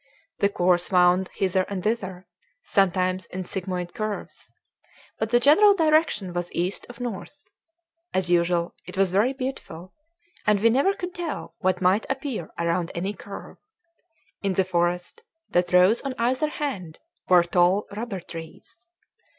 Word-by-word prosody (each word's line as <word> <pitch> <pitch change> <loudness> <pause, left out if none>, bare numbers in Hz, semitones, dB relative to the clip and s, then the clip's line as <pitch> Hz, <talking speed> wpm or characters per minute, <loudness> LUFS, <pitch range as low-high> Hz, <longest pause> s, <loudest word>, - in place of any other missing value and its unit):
The 200 - +3
course 180 -2 +1
wound 180 0 +4
hither 190 -1 +1
and 195 -3 -4
thither, 190 -4 -2 0.4
sometimes 185 -1 +1
in 185 0 -5
sigmoid 180 -1 -4
curves; 215 -3 -5 0.7
but 220 - -1
the 240 +1 +4
general 365 - +6
direction 310 - +2
was 175 0 -3
east 180 +3 -2
of 245 0 -11
north. 245 +5 -7 0.6
As 185 -1 0
usual, 175 0 +1
it - - -8
was 195 -2 +3
very 210 +7 +3
beautiful; 255 - -6 0.5
and 210 -1 +4
we 230 +3 +4
never 280 - +3
could 360 -2 -6
tell 345 -3 -5
what 185 -2 0
might 190 +4 +3
appear 270 - -3
around 170 0 0
any 190 +4 -2
curve. 200 -1 -10 0.8
In 195 -2 0
the 190 0 +2
forest 175 - -1 0.3
that 175 0 +1
rose 185 +5 +5
on 270 -2 -4
either 255 +6 +1
hand 200 - -4 0.3
were 180 -1 +7
tall 180 +3 +2
rubber 215 -4 -4
trees. 170 +8 -11
190 Hz, 145 wpm, -25 LUFS, 180-235 Hz, 0.8 s, were